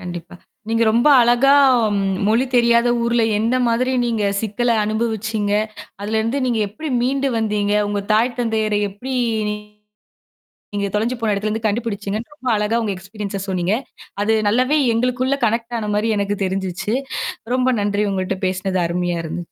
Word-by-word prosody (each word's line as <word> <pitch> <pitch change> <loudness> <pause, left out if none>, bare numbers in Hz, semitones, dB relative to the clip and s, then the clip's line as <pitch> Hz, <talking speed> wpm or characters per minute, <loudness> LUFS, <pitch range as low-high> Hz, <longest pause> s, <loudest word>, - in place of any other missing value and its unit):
கண்டிப்பா. 175 -1 -8 0.3
நீங்க 230 0 +1
ரொம்ப 235 +6 +3
அழகா 245 +4 +5 0.7
மொழி 230 +4 +3
தெரியாத 235 0 +4
ஊர்ல 235 0 +2 0.2
எந்தமாதிரி 245 +2 +1
நீங்க 225 -3 0 0.2
சிக்கல 230 +3 -1
அனுபவிச்சீங்க? 215 -1 -1 0.5
அதலருந்து 220 +5 -1
நீங்க 235 -2 0
எப்பிடி 300 +8 -6
மீண்டு 275 +2 +1
வந்தீங்க? 210 -2 0
உங்க 205 0 -1
தாய் 235 +3 +2
தந்தையரை 220 -2 0
எப்பிடி 250 +7 -6 0.4
நீங்க 210 0 -4 1.1
நீங்க 200 -1 -1
தொலஞ்சு 225 +4 0
போன 220 -2 +1
இடத்துலேருந்து 215 +2 -2
கண்டுபிடிச்சுங்கன்னு 215 +1 -2
ரொம்ப 260 -3 -9
அழகா 210 +2 0
உங்க 215 - -1
எக்ஸ்பீரியன்ஸ 200 +1 -6
சொன்னீங்க. 185 0 0 0.5
அது 220 +2 +2
நல்லாவே 255 +8 +2 0.2
எங்களுக்குள்ள 250 +3 0
கனெக்ட் 230 +2 -1
ஆனமாரி 210 +1 -1
எனக்கு 200 0 -1
தெரிஞ்சுச்சு. 190 +2 -2 0.6
ரொம்ப 255 0 +2
நன்றி 205 0 0
உங்கள்ட்ட 190 0 -2
பேசினது 185 0 -1
அருமையா 175 0 -1
இருந்துச்சு. 160 +2 -4
220 Hz, 135 wpm, -20 LUFS, 205-240 Hz, 1.1 s, அழகா